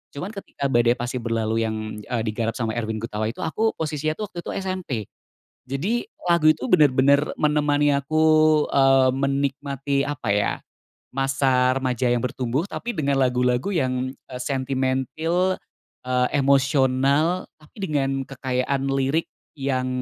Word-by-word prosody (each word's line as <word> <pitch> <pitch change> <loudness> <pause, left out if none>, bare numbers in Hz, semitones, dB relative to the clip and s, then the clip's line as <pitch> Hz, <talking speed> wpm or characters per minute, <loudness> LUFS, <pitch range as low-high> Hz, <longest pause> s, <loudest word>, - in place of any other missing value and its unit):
Cuman 180 +8 -5
ketika 170 -9 -4
Badai 120 0 +4
Pasti 125 +1 -3
Berlalu 115 -1 -1
yang, 110 -1 -5
eee, 115 +2 -3
digarap 115 +1 -2
sama 115 -2 -2
Erwin 110 -1 -3
Gutawa 110 -1 -2
itu, 125 +11 -5
aku 220 +8 0
posisinya 155 0 -2
tuh 210 +2 -6
waktu - - -13
itu - - -2
SMP. 185 -1 -4 0.7
Jadi 155 - -1 0.2
lagu 170 -3 +5
itu 155 - -4
bener-bener 140 - +4 0.2
menemani 145 -1 +2
aku, 140 +3 -1 0.5
eee, 135 -1 +4
menikmati, 140 0 -1
apa 145 -6 -4
ya, 65 -13 +1 0.6
masa 135 -1 +2
remaja 125 -1 0
yang 120 - +2
bertumbuh, 125 +4 -1
tapi 240 - -4
dengan 140 -2 +1
lagu-lagu 125 +4 +1
yang, 130 -6 -1 0.2
eee, 125 - -7
sentimentil, 135 +7 0 0.5
eee, 125 0 +1
emosional, 140 +4 +2
tapi 150 - -21
dengan 135 -3 -1
kekayaan 130 0 -2
lirik 135 +4 0 0.3
yang 135 -3 -1
135 Hz, 135 wpm, -23 LUFS, 125-150 Hz, 0.7 s, lagu